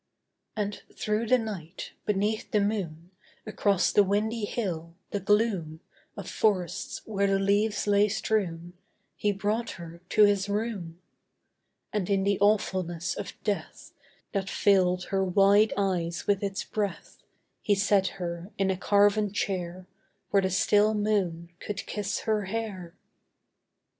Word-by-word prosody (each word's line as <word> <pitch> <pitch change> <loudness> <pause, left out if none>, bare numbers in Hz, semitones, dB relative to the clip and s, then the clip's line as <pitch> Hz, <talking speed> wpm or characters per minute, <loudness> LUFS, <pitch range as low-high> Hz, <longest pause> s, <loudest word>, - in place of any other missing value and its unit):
And 205 -1 -3
through 215 +2 -1
the 255 - +5
night, 195 -7 -6 0.2
beneath 210 +2 0
the 210 - +2
moon, 180 -5 -2 0.3
Across 205 -3 +1
the 205 - +5
windy 210 +3 0
hill, 170 -7 -4 0.2
the 205 - -1
gloom 195 -6 +1 0.4
Of - - -6
forests 195 -3 -1
where 200 -2 0
the 195 0 +2
leaves 205 +2 +1
lay 205 0 +4
strewn, 180 -5 -1 0.4
He 205 - +1
brought 210 +4 -1
her 170 0 -10
to 215 - +5
his 205 -1 +3
room: 200 -6 -3 0.9
And 210 -3 -1
in 195 -1 +2
the 200 0 +1
awfulness 185 -4 +1
of - - -6
death, 205 -2 -4 0.4
That 195 -2 -2
filled 185 -3 +3
her 195 -1 +1
wide 200 +3 +4
eyes 180 -4 -1
with 200 -1 +2
its 195 -1 -2
breath, 205 -2 -4 0.4
He 205 - +2
set 200 -1 +3
her 175 +1 -5
in 195 -1 +2
a 185 - -2
carven 205 +1 +3
chair 185 -2 -3 0.5
Where 200 - +4
the 190 - 0
still 205 +3 +3
moon 190 -5 0
could 205 -1 -5
kiss 210 0 -3
her 215 -2 0
hair. 190 -4 -5
200 Hz, 140 wpm, -28 LUFS, 185-210 Hz, 0.9 s, the